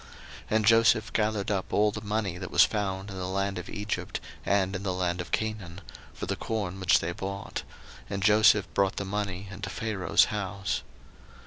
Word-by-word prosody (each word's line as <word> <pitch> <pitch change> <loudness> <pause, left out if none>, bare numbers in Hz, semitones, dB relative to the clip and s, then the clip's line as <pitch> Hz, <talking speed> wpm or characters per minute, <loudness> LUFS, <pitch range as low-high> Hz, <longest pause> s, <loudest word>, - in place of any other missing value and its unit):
01:047:014 - - -18 0.5
And 110 -1 +3
Joseph 115 0 +5
gathered 105 -2 0
up 95 -2 -2
all 105 0 +3
the 110 - -6
money 105 -4 -2
that 95 - -5
was 85 - +6
found 100 -2 -1
in 95 - -7
the 90 -1 -3
land 100 +1 -1
of - - -8
Egypt, 105 +1 -3 0.2
and 95 0 +1
in 95 - -3
the 95 -2 -2
land 90 -1 -1
of 85 - -8
Canaan, 105 -5 -2 0.4
for - - -4
the - - -2
corn 100 -4 -3
which 95 -2 +4
they 85 - -2
bought: 100 +2 -5 0.5
and 100 -1 -3
Joseph 105 0 +6
brought 100 -1 +2
the 100 - -3
money 100 -1 -3
into 100 +1 -6
Pharaoh's 105 -3 +2
house. 100 -2 -2
100 Hz, 190 wpm, -28 LUFS, 95-105 Hz, 0.5 s, was